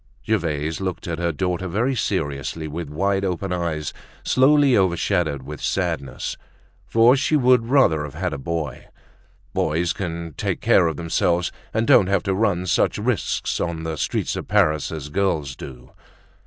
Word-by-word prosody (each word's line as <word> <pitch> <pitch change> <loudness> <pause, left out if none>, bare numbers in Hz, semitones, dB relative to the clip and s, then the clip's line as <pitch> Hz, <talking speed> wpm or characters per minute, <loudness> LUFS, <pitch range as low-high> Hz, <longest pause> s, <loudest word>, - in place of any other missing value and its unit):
Gervaise 80 -6 -1
looked 95 -2 -4
at 85 -1 -3
her 85 -1 0
daughter 90 +3 -2
very 115 +9 0
seriously, 80 - -2
with 80 0 -5
wide 95 +6 0
open 95 0 -2
eyes, 80 -4 -2 0.3
slowly 140 0 +4
overshadowed 85 -6 +1
with 75 +1 -8
sadness, 70 -2 -2 0.5
for 115 +3 +5
she 140 +3 +1
would 125 -4 +4
rather 120 - +4
have 75 -1 -7
had 90 0 -2
a - - -4
boy. 75 -2 -4 0.7
Boys 80 +3 0
can 85 -3 -5
talk - - -2
care - - +4
of 80 -3 -3
themselves 85 +1 0 0.2
and 110 +1 0
don't 95 - +6
have 100 - +1
to 95 -1 0
run 95 -3 +1
such 90 - +1
risks - - -1
on 85 -2 -2
the 80 -1 -3
streets 75 - -1
of - - -5
Paris 75 -8 +2
as 75 -3 -6
girls 80 -6 -1
do. 65 -3 -11
85 Hz, 160 wpm, -22 LUFS, 75-100 Hz, 0.7 s, don't